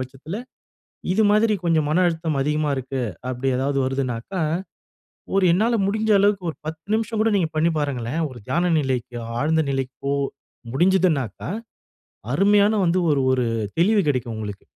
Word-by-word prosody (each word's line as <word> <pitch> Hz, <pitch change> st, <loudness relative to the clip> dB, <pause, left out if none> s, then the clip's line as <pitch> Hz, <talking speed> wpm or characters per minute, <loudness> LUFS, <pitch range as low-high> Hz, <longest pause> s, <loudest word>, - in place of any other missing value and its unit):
பட்சத்தில 135 Hz, +7 st, -6 dB, 0.8 s
இது 200 Hz, +4 st, +2 dB
மாதிரி 215 Hz, +1 st, +3 dB
கொஞ்சம் 160 Hz, -3 st, +2 dB
மன 165 Hz, +4 st, +3 dB
அழுத்தம் 160 Hz, -3 st, -1 dB
அதிகமா 150 Hz, +1 st, 0 dB
இருக்கு 130 Hz, 0 st, -3 dB, 0.3 s
அப்படி 130 Hz, +1 st, -3 dB
ஏதாவது 135 Hz, +2 st, 0 dB
வருதுனாக்கா, 130 Hz, +6 st, -2 dB, 0.9 s
ஒரு 195 Hz, -1 st, +3 dB
என்னால 220 Hz, +7 st, +2 dB
முடிந்த 215 Hz, +2 st, +1 dB
அளவுக்கு 200 Hz, -3 st, +2 dB
ஒரு -, -, -12 dB
10 160 Hz, 0 st, -6 dB
நிமிஷம் 220 Hz, 0 st, -1 dB
கூட 225 Hz, 0 st, +2 dB
நீங்க 170 Hz, -5 st, 0 dB
பண்ணி 165 Hz, +2 st, +2 dB
பாருங்களேன், 140 Hz, 0 st, -2 dB
ஒரு 125 Hz, -2 st, -11 dB
தியான 170 Hz, +6 st, +1 dB
நிலைக்கு 130 Hz, -3 st, -2 dB, 0.2 s
ஆழ்ந்த 160 Hz, +2 st, +2 dB
நிலைக்கோ 135 Hz, +1 st, -2 dB, 0.6 s
முடிஞ்சதுனாக்கா 165 Hz, -, +1 dB, 0.8 s
அருமையான 205 Hz, +1 st, +4 dB
வந்து 175 Hz, +2 st, +2 dB
ஒரு 140 Hz, -2 st, +2 dB
ஒரு 125 Hz, -1 st, +1 dB, 0.3 s
தெளிவு 205 Hz, +5 st, +4 dB
கிடைக்கும் 120 Hz, -4 st, -1 dB
உங்களுக்கு. 105 Hz, -2 st, -6 dB
155 Hz, 140 wpm, -23 LUFS, 130-190 Hz, 0.9 s, அருமையான